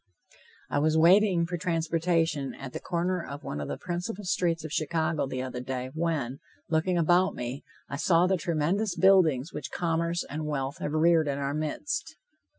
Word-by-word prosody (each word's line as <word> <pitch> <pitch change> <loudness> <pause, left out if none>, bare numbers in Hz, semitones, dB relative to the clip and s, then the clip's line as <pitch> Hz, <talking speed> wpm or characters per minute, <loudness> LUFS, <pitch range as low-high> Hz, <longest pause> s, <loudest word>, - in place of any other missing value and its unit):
I - - +2
was 155 +2 +2
waiting 180 +1 +5
for 175 +1 -3
transportation 165 -4 0
at 135 -2 -8
the - - -4
corner 180 0 -1
of 140 +1 -8
one 75 - -4
of 70 - -4
the - - -4
principal 180 +4 -4
streets 170 -3 0
of 155 - -6
Chicago, 160 -1 0
the 130 -1 -3
other 130 -1 -5
day, 130 0 -4
when, 155 -6 -2 0.3
looking 165 +3 +1
about 175 +3 +3
me, 125 +3 -5 0.2
I 140 - -5
saw 170 +3 +4
the 190 +1 +2
tremendous 175 +4 0
buildings 175 -7 +4
which - - -5
commerce 170 0 -1
and 155 +1 -4
wealth 140 -2 -3
have 145 - -3
reared 160 0 +4
in 140 -1 -1
our 140 0 -2
midst. 155 - -3
160 Hz, 175 wpm, -28 LUFS, 145-175 Hz, 0.3 s, waiting